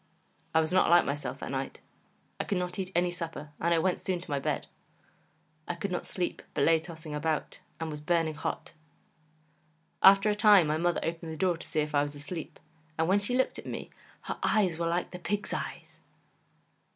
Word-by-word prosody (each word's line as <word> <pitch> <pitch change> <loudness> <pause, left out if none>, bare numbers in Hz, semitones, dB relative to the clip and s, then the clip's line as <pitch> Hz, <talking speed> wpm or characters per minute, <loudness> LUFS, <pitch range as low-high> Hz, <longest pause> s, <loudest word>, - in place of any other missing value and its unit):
I 160 - +6
was 160 +3 -1
not 185 - +4
like 175 0 +6
myself 145 +1 -3
that - - -4
night; - - -3 0.6
I - - +1
could 200 - -1
not 180 +2 -3
eat 185 -1 -3
any 175 +1 +3
supper, 165 -3 -6
and 170 - +2
I 170 - +5
went 180 +2 +1
soon 185 -2 -1
to 175 -2 -9
my 140 - +1
bed; - - -1 1.0
I 175 - -2
could 185 +3 -3
not 180 - -3
sleep, 180 -2 -2
but - - +2
lay 165 0 +5
tossing 160 -1 -8
about; 155 +1 -2 0.2
and 160 -1 -3
was 150 0 -6
burning 165 0 +1
hot. 150 - -4 1.3
After 195 +2 +7
a - - +2
time 205 -4 +7
my 155 +1 +1
mother 175 +1 +1
opened 165 0 -3
the 160 - -6
door 185 -1 +2
to 165 - -10
see 155 - 0
if 150 0 -3
I 145 - +4
was 145 0 -3
asleep, 150 +3 -7 0.4
and 160 0 +2
when 195 +3 +4
she 245 +5 0
looked 260 - +1
at - - -9
me, - - -5 0.3
HER - - -5
EYES 185 -6 +2
WERE 170 - 0
LIKE 175 +1 -1
THE 180 - -7
PIG'S 205 +3 -2
EYES. - - -6
170 Hz, 210 wpm, -30 LUFS, 160-185 Hz, 1.3 s, After